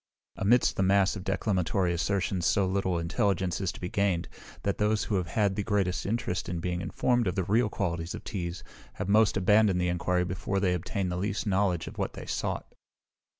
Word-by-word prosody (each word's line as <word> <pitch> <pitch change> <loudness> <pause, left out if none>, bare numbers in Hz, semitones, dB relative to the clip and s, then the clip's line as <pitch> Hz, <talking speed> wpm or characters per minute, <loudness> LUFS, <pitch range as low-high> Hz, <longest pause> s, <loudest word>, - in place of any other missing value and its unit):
Amidst 115 +3 +3
a - - +4
mass 95 +1 +3
of 95 - -6
declamatory 95 -2 0
assertion 95 +1 0
so 95 +3 +2
little 95 -1 0
intelligence 85 +2 0
is 95 -2 0
to - - -11
be 90 - -4
gained, 95 -2 0 0.4
that 100 - -1
those 105 0 +2
who - - -3
have 90 -2 -2
had 100 +2 +1
the 105 - -1
greatest 100 -4 0
interest 105 -4 -2
in 85 -1 -2
being 90 +1 -2
informed 120 +2 +1
of 90 - -1
the 95 - 0
real 110 +5 +2
qualities 85 -5 -2
of - - -8
teas, 85 -4 -4 0.3
have - - -4
most 105 +1 +4
abandoned 100 0 +4
the 90 0 +1
enquiry 90 +1 0
before 95 +2 -2
they 95 -2 +2
obtained 90 +1 -2
the 90 - -2
least 100 +2 -2
knowledge 95 -5 +1
of - - -9
what - - -2
they - - -8
sought. - - -3
95 Hz, 200 wpm, -28 LUFS, 90-100 Hz, 0.4 s, a